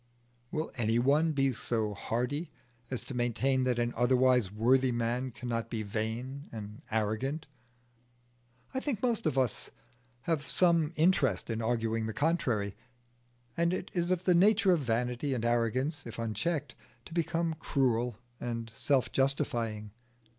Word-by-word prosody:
Will 155 +3 -3
any 115 -1 +2
one 145 +6 +3
be 135 -3 +2
so 110 -2 -1
hardy 125 - -2 0.4
as 125 - -3
to - - -7
maintain 130 +2 +1
that 125 -2 +1
an 120 0 0
otherwise 125 -3 +3
worthy 125 +5 +3
man 120 +2 -1
cannot 115 -1 -4
be 115 -2 -3
vain 115 +7 -4
and 105 -1 -8
arrogant? 110 +7 -1 1.3
I 260 - 0
think 260 -6 -3
most 235 -8 +1
of 140 -4 0
us 130 -3 0 0.5
have 150 0 -1
some 170 -4 +3
interest 165 -6 +2
in 115 0 -2
arguing 115 -1 0
the 110 - -5
contrary. 125 - 0 0.8
And 170 +2 +2
it 185 - -6
is 175 -1 0
of 185 -1 +1
the 180 - +4
nature 200 +2 +5
of 175 - +4
vanity 125 +2 -1
and 120 -1 -2
arrogance, 120 +5 0
if 115 - -8
unchecked, 120 - -2 0.3
to - - -11
become 170 0 0
cruel 125 -6 +1 0.2
and 115 -1 -4
self 135 +2 +1
justifying. 115 -6 0
125 Hz, 145 wpm, -31 LUFS, 115-155 Hz, 1.3 s, nature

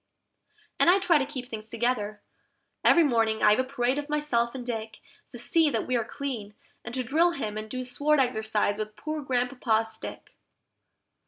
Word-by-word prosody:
And - - +5
I 365 - +7
try 345 -5 +3
to 270 - -1
keep 260 -4 -6
things 220 -2 -7
together: 225 -3 -1 0.6
every 340 - +6
morning 225 -6 +1
I 210 - +7
have 210 - +3
a - - +3
parade 260 0 0
of 290 0 -6
myself 270 -5 0
and 250 -2 -6
Dick, 220 -2 -5 0.3
To 245 - -9
see 315 +6 +3
that - - -1
we 255 - -1
are 235 - +1
clean, 230 -4 -5 0.3
and 240 - -6
to 255 - -1
drill 330 +8 +3
him 215 -9 -4
and 215 0 -5
do 255 +1 -4
sword 290 +4 +2
exercise 220 -4 0
with 215 0 -4
poor 310 0 -4
Grandpapa's 245 -4 0
stick. - - -9
245 Hz, 185 wpm, -27 LUFS, 220-280 Hz, 0.6 s, I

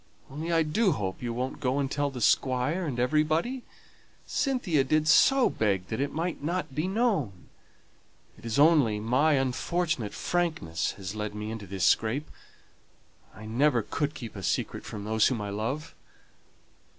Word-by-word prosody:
Only 155 +5 -4
I 165 -1 +3
do 185 +5 +2
hope 95 -7 -4
you 120 -1 -3
won't 125 +4 -3
go 130 -1 0
and 140 -1 -1
tell 145 0 0
the 130 -3 -7
Squire 130 +10 +2
and 125 -4 -3
everybody. 155 - +1 0.6
Cynthia 245 - +1
did 155 +3 +1
so 270 - +6
beg 95 -4 -1
that 110 +3 -2
it 140 - -1
might 170 +2 -3
not 170 -1 -2
be 155 +6 -1
known. 190 - -1 0.9
It - - -18
is 115 +1 -2
only 145 -8 +5
my 130 +8 +2
unfortunate 135 -1 -1
frankness 160 - -1
that - - -6
has 95 -1 -6
led 105 -1 -4
me 105 +1 -4
into 110 -3 -7
this 95 0 -1
scrape. 120 +7 +1 1.0
I 110 - -10
never 120 +2 +2
could 145 +5 -2
keep 115 -8 -8
a 100 - -6
secret - - -2
from 105 -2 -6
those 110 +1 +3
whom 125 -4 -1
I 105 -1 -4
love." 130 +10 -3
135 Hz, 165 wpm, -28 LUFS, 110-160 Hz, 1.0 s, so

